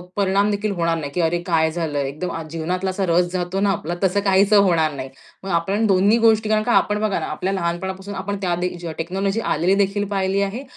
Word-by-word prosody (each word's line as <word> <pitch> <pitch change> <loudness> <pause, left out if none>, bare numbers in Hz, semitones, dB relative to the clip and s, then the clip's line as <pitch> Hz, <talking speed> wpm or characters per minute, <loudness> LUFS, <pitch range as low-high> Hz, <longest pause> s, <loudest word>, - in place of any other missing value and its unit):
परिणाम 200 +1 +2
देखील 205 +1 -1
होणार 170 -1 0
नाही, 145 -3 -5
की 180 - -1
अरे 170 +1 0
काय 160 -2 +1
झालंय? 155 -4 -2
एकदम 170 +6 -5
आज 165 -1 -6
जीवनातला 180 +4 -2
असा 190 +1 -1
रस 175 +1 +2
जातो 180 +1 -2
ना 205 - +2
आपला, 175 -2 -3
तसं 190 +1 +2
काहीसं 195 +2 +4
होणार 165 -5 +2
नाही. 135 -1 -6 0.3
मग 195 - -6
आपण 190 +6 +1
दोन्ही 200 +3 +4
गोष्टी 220 -2 +3
कारण 215 0 +2
का 240 - 0
आपण 210 0 +2
बघा 215 -4 0
ना 160 - -3
आपल्या 185 +5 -3
लहानपणापासून 190 +2 -3
आपण 200 +1 -3
त्या 180 -2 0
दे 180 +1 -2 0.2
टेक्नॉलॉजी 195 +5 -2
आलेलीदेखील 195 +4 +1
पाहिली 195 0 0
आहे 200 +7 -3
190 Hz, 210 wpm, -21 LUFS, 170-200 Hz, 0.3 s, काहीसं